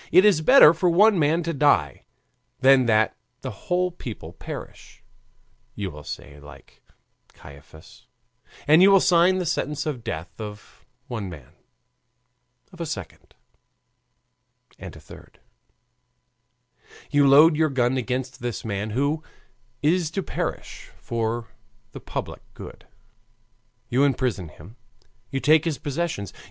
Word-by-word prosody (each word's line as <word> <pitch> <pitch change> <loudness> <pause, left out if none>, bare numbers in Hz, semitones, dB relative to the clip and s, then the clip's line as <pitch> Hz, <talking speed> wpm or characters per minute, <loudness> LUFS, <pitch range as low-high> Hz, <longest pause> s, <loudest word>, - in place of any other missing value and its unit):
It 185 - +6
is 200 -7 +4
better 165 - +7
for 175 +2 +1
one 200 +3 +4
man 160 +3 +1
to 165 +1 -3
die 130 - +1 0.5
than 130 -1 +5
that 110 -1 +2 0.3
the - - -5
whole 180 - -2
people 110 - -9
perish, 80 - -10 0.7
you 100 -3 -4
will 75 -1 -11
say 75 0 -9
like 75 -1 -16 0.5
Caiaphas, 80 - -16 0.6
and 155 +4 +6
you 195 +1 +7
sign 180 +1 +3
the 180 - -2
sentence 150 -1 -2
of 140 -7 -4
death 85 +5 -7
of 105 -1 -11 0.2
one 110 -8 -5
man, 75 -8 -12 1.2
of 175 - -10
a - - -2
second, 100 - -8 1.4
and - - -9
a - - -12
third; - - -16 1.7
you 145 -1 +4
load 150 +4 +7
your 155 0 +2
gun 130 -1 0
against 125 0 -3
this 120 -3 -5
man 105 0 -3
who 140 +7 -1 0.6
is 165 +1 +2
to 195 +3 -4
perish - - -6
for 115 0 -3 0.4
the - - -9
public - - -6
good, - - -12 1.0
you 130 +3 +1
imprison 130 -10 0
him, 90 +10 -15 0.5
you 135 - -3
take 155 +2 +4
his 160 -5 -2
possessions. 145 -8 -4
135 Hz, 130 wpm, -23 LUFS, 105-160 Hz, 1.7 s, better